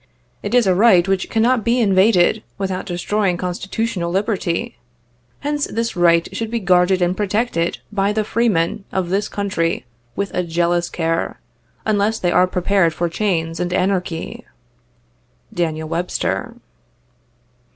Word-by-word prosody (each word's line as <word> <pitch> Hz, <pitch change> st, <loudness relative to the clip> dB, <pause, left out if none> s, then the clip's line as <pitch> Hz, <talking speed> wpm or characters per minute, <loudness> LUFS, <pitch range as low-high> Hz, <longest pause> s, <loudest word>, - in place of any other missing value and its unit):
It 205 Hz, +4 st, -2 dB
is 245 Hz, -2 st, +5 dB
a 190 Hz, -, +4 dB
right 185 Hz, -2 st, +5 dB
which 195 Hz, -1 st, 0 dB
cannot 230 Hz, +1 st, +2 dB
be 235 Hz, +3 st, +2 dB
invaded 200 Hz, -1 st, +4 dB, 0.2 s
without 190 Hz, -2 st, -3 dB
destroying 180 Hz, +1 st, 0 dB
constitu 185 Hz, +4 st, -3 dB
tional 180 Hz, -7 st, -2 dB
liberty. 200 Hz, +2 st, -1 dB, 0.6 s
Hence 290 Hz, 0 st, -1 dB
this 230 Hz, -1 st, -2 dB
right 170 Hz, -1 st, +4 dB
should 225 Hz, -1 st, -3 dB
be 235 Hz, +1 st, -1 dB
guarded 180 Hz, -1 st, +3 dB
and 175 Hz, +1 st, +1 dB
protected 205 Hz, -3 st, 0 dB
by 200 Hz, -1 st, +1 dB
the 215 Hz, 0 st, 0 dB
free 230 Hz, +3 st, +1 dB
men 170 Hz, +1 st, 0 dB
of 180 Hz, -2 st, -2 dB
this 200 Hz, +2 st, 0 dB
Country 190 Hz, -7 st, -1 dB, 0.3 s
with 200 Hz, -1 st, -3 dB
a 180 Hz, -, +1 dB
jealous 170 Hz, 0 st, 0 dB
care, 165 Hz, -1 st, -2 dB, 0.5 s
unless 215 Hz, +1 st, +1 dB
they 175 Hz, -4 st, 0 dB
are 180 Hz, +1 st, +4 dB
prepared 180 Hz, -2 st, +1 dB
for 170 Hz, +1 st, -1 dB
chains 165 Hz, -3 st, -1 dB
and 180 Hz, 0 st, -2 dB
anarchy." 180 Hz, -2 st, -1 dB, 0.6 s
[ -, -, -30 dB
Daniel 160 Hz, -2 st, -2 dB
Webster. 175 Hz, +3 st, -2 dB
185 Hz, 145 wpm, -19 LUFS, 175-210 Hz, 0.6 s, is